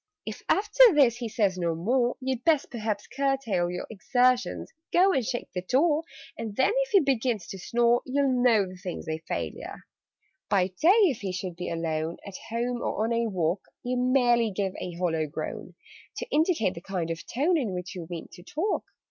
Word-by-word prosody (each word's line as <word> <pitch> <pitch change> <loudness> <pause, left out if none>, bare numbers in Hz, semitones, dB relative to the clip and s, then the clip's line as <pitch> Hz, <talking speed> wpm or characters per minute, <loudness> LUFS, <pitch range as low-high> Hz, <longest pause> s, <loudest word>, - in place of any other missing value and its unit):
"If - - -6
after 430 +4 +6
this 250 -5 +5
he 240 -2 -4
says 200 -4 0
no 170 -2 0
more, 240 +8 +1
You'd 260 -2 -2
best 310 -4 +2
perhaps 215 -3 -3
curtail 265 -10 0
your 180 0 -4
Exertions 250 +4 +1 0.2
go 375 +2 +5
and 265 - +1
shake 240 +2 -3
the 180 - -2
door, 295 - +2 0.3
And 220 -3 -6
then, 265 - +3
if - - 0
he 395 -3 +5
begins 245 - 0
to 195 - -7
snore, 240 +4 +2
You'll 260 -1 +1
know 225 -5 +4
the 185 0 -10
thing's 180 -1 -6
a 160 0 -2
failure. - - -5 0.7
"By 190 -2 +2
day, 195 - +1
if 270 - +2
he 195 -2 -3
should 180 -1 -5
be 180 +1 -5
alone 165 -1 -2
At 200 -2 -7
home 240 +1 -2
or 215 - -1
on 230 +1 0
a 230 0 +1
walk 180 -1 0 0.2
You 250 +1 -1
merely 245 -2 +3
give 195 -1 -2
a 180 - -5
hollow 165 -3 0
groan, 145 - -6 0.4
To - - -3
indicate 315 - +2
the 170 - -9
kind 175 -3 -3
of 165 - -5
tone 300 +9 +1
In 255 -11 0
which 180 +2 -5
you 175 -4 -7
mean 170 -2 -6
to 175 - -12
talk. 320 - -2
230 Hz, 195 wpm, -27 LUFS, 180-265 Hz, 0.7 s, after